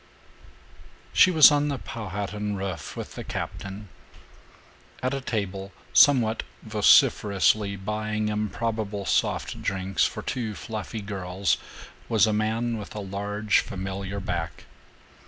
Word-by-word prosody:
II - - -25
She - - +7
was 160 -4 +8
on 145 0 +2
the 140 -2 -1
Powhatan 105 -2 -4
roof 95 -5 -5
with - - -6
the - - -6
captain. 100 +2 -6 1.2
At 130 +2 0
a 135 - -2
table, 100 -5 -3 0.2
somewhat 120 -6 +5 0.2
vociferously 100 -2 +4
buying 105 +2 -2
improbable 105 -1 -2
"soft - - 0
drinks" 95 -1 0
for - - -1
two 110 -5 -3
fluffy 110 0 -5
girls, 95 -2 -1 0.5
was 110 -4 +5
a 110 - +1
man 110 +2 0
with 105 - -9
a - - -3
large 100 +2 0
familiar 95 +1 -4
back. 90 -4 -4
105 Hz, 120 wpm, -26 LUFS, 95-110 Hz, 1.2 s, was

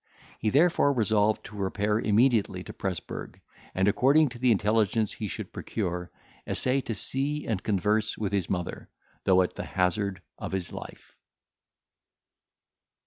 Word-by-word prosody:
He 110 - +1
therefore 145 +1 +4
resolved 110 -3 +2
to 105 - -10
repair 105 +2 0
immediately 110 -4 +2
to - - -9
Presburg; 90 -6 -5 0.4
and, 95 +1 +2
according 135 +9 +4
to 120 - -10
the 125 0 +4
intelligence 110 0 +2
he 105 - -4
should - - -6
procure, 90 -4 -3 0.4
essay 130 +2 +1
to 115 - -4
see 140 +7 -1
and 105 -5 -1
converse 105 +1 0
with 100 -2 -2
his 100 -4 0
mother, 90 -2 -3 0.4
though 95 -1 +5
at 90 - -3
the - - -5
hazard 95 +1 -1 0.2
of - - -5
his 95 -2 -3
life. - - -10
105 Hz, 140 wpm, -28 LUFS, 95-115 Hz, 0.4 s, though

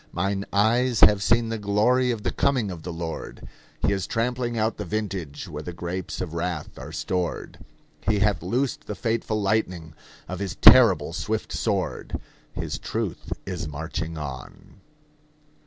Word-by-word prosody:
Mine 100 +2 -1
eyes 115 +4 +3
have 105 -1 +7
seen 115 +2 +3
the 115 -1 -2
glory 110 +5 +3
of 115 -4 -2
the - - 0
coming 125 -8 +1
of 85 -3 -7
the 90 - -5
Lord: 80 -1 -6 0.4
He 100 - +3
is 95 -2 -2
trampling 120 +1 -1
out 110 +1 +1
the 105 - -3
vintage 100 -5 -4
where 75 -3 -6
the 85 +3 -6
grapes 90 +1 -4
of 85 - -4
wrath 85 -4 -3
are 70 +4 -8
stored; 85 +3 -3 0.5
He 110 -1 +3
hath 105 0 +2
loosed 130 +2 -1
the - - -3
fateful 110 -2 -1
lightning 95 -6 0 0.3
of - - -5
his 100 -3 -3
terrible - - +7
swift - - -2
sword; - - -1 0.3
His - - -4
truth - - -4
is 90 -3 -4
marching 80 +2 -4
on. 70 -5 -8
100 Hz, 155 wpm, -25 LUFS, 85-110 Hz, 0.5 s, have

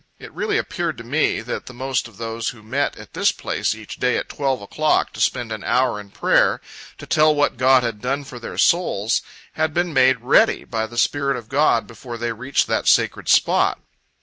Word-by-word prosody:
It - - -12
really 430 -1 -1
appeared 170 - -3
to 115 - -8
me, 145 +7 0
that 120 +2 -6
the 130 - -10
most 130 0 -2
of 110 -5 -18
those 115 0 -3
who 110 -3 -11
met 135 +6 -2
at - - -13
this - - +2
place - - -2
each 110 -2 -10
day 125 0 +1
at - - -4
twelve 135 -3 -1
o'clock 150 +10 0
to - - -10
spend 120 -2 0
an 110 -2 -5
hour 125 -4 +1
in 100 -1 -11
prayer, - - +2 0.4
to - - -10
tell 155 0 +3
what 145 0 +1
God 130 +1 +4
had 115 -3 -3
done 135 +3 -2
for 130 -3 -10
their - - -8
souls, 120 - +2 0.3
had 155 -1 -1
been 175 -1 0
made 130 -3 +4
"ready," 125 +3 +3
by 110 -2 -3
the 120 +1 -11
Spirit 140 +1 +1
of 115 -2 -10
God 135 -4 +2
before 120 +1 -9
they 120 0 -2
reached 130 +5 0
that - - -1
sacred - - +2
spot. - - +3
125 Hz, 210 wpm, -21 LUFS, 115-145 Hz, 0.4 s, God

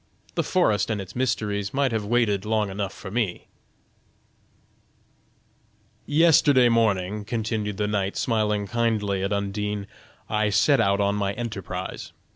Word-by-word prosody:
The - - +1
forest 115 - +1
and 110 -2 -1
its 95 -2 -8
mysteries 105 -4 -1
might 135 -2 +2
have 110 -2 -1
waited 105 -3 +1
long 105 -2 0
enough 100 0 -3
for 95 - -9
me!" 110 -5 -2 2.6
"Yesterday 145 -5 +5
morning." 105 -3 +1
continued 110 -2 -3
the 105 - 0
knight, 100 -2 -1
smiling 105 -3 0
kindly 105 -2 0
at 100 +1 -2
Undine, 100 0 -2 0.4
"I 105 0 +1
set 135 +5 +4
out 100 -2 +2
on 100 0 +2
my 100 -1 -1
enterprise. 95 -5 -6
105 Hz, 130 wpm, -25 LUFS, 100-115 Hz, 2.6 s, Yesterday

